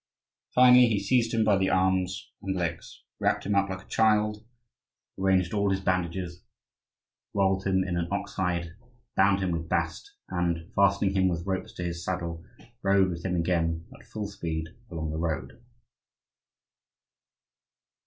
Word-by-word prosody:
Finally, 125 -1 +8
he 110 -3 +1
seized 115 +3 +2
him 115 -1 +2
by 105 -2 +4
the 95 0 +1
arms 95 0 0
and 95 0 -2
legs, 85 -8 -4 0.2
wrapped - - +1
him 105 - 0
up 100 0 +2
like 95 0 -5
a - - -26
child, 105 -1 +2 0.8
arranged 95 -2 +2
all 100 -1 +2
his 95 0 +1
bandages, 90 -1 -2 0.9
rolled 95 -1 +2
him 95 -1 +2
in 90 -2 -3
an 85 -1 -1
ox 100 - -3
hide, 85 -3 -1 0.4
bound 100 0 +4
him 90 - 0
with 80 -1 -3
bast, 405 0 -2
and, 85 -1 -2
fastening 100 0 +3
him 95 -1 +3
with 85 -1 -2
ropes 95 -1 -3
to 90 - -5
his 85 0 -4
saddle, 85 -2 -3 0.4
rode 95 -1 +3
with 85 0 -6
him 90 -1 -1
again 85 -1 0
at - - -17
full 110 -1 -5
speed 80 -5 -4 0.2
along 80 -2 -4
the 80 - -3
road. 85 +7 -3
95 Hz, 155 wpm, -27 LUFS, 85-100 Hz, 0.9 s, Finally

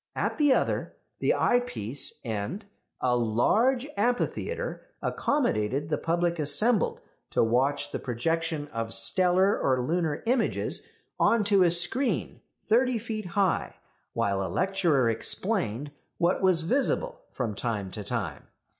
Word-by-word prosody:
At - - -2
the 295 -2 +4
other, - - 0 0.2
the - - +2
eyepiece, 140 - 0
end, 115 - -4 0.4
a 125 -1 +2
large 215 - +2
amphitheatre 245 - -2 0.2
accommodated 145 - -1
the - - -1
public 170 0 0
assembled 195 +11 +3 0.3
to - - +2
watch 135 +5 +1
the - - -3
projection 160 +5 -2
of 115 -2 0
stellar 185 +1 +3
or 130 -1 +1
lunar 160 0 -1
images 240 0 +1 0.3
on 230 -2 +3
to 200 -1 +3
a 180 - +5
screen 175 +11 +1 0.2
thirty 245 +2 +2
feet 215 -3 -5
high, 190 0 0 0.4
while 100 -1 0
a - - -3
lecturer 180 -9 +1
explained 140 - -1 0.3
what 175 +1 +1
was 185 -3 +3
visible 285 - 0
from 115 -5 -3
time 105 -3 -3
to 105 - -6
time. 100 - -4
170 Hz, 130 wpm, -27 LUFS, -, 0.4 s, a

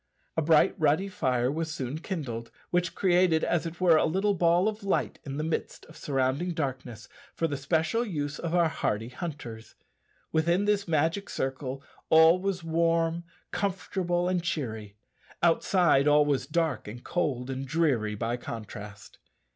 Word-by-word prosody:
A 160 - +1
bright 155 0 +4
ruddy 155 +6 +2
fire 125 -7 0
was 160 +1 -3
soon 140 -1 -4
kindled, 135 - -5 0.2
which 175 0 0
created, 175 -3 +3
as 170 -1 0
it 165 +1 -8
were, 175 -3 +5
a - - +3
little 195 +5 +1
ball 175 +1 +3
of 215 -1 -3
light 195 - -1
in 140 0 -5
the 150 - -2
midst 160 0 -3
of 160 - -16
surrounding 140 +4 -1
darkness 130 -6 -4 0.3
for 165 - 0
the 145 - -3
special 160 - 0
use 150 -9 -3
of 170 0 -2
our 170 -2 +4
hardy 110 -7 -2
hunters. 125 -7 -7 0.6
Within 170 +5 +2
this 205 -1 +1
magic 165 +5 0
circle 135 0 -3 0.3
all 160 +3 +6
was 190 -2 -2
warm, 165 +1 +1 0.3
comfortable, 180 -2 -1
and 180 -1 +1
cheery; 110 -11 -4 0.5
outside 165 -4 +3
all 150 0 +5
was 140 -3 0
dark, 160 -5 -1
and 120 +4 -8
cold, 135 -7 -1
and 135 +1 -4
dreary 130 -10 +1
by 115 +3 -2
contrast. 105 -3 -9
160 Hz, 155 wpm, -28 LUFS, 135-175 Hz, 0.6 s, all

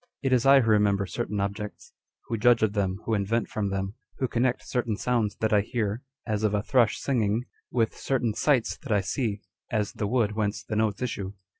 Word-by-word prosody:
It 135 -1 +2
is 125 0 +3
Jwho 135 -2 +7
remember 105 -2 +3
certain 105 +1 -3
objects, 100 +1 -4 0.3
who 115 - -2
judge 115 +1 +4
of 105 -2 +2
them, 95 -2 -1
who 115 - 0
invent 110 +3 0
from 105 -2 -2
them, 95 0 -2 0.2
who 130 - 0
connect 120 +1 0
certain 120 -4 -1
sounds 115 -4 0
that 110 -1 +2
I 105 - +5
hear, 110 0 -2 0.2
as 110 -2 -1
of 105 -1 +2
a 100 - 0
thrush 120 -4 +3
singing, 115 -4 +1 0.3
with 115 -2 +1
certain 125 -5 0
sights 130 -1 +2
that 140 - -6
I 105 -2 +3
see, 105 +1 -2 0.3
as 105 -3 -1
the 105 - -2
wood 115 -2 +2
whence 105 -1 -2
the 110 - -4
notes 110 +1 0
issue. 100 -5 -3
110 Hz, 200 wpm, -27 LUFS, 100-120 Hz, 0.3 s, Jwho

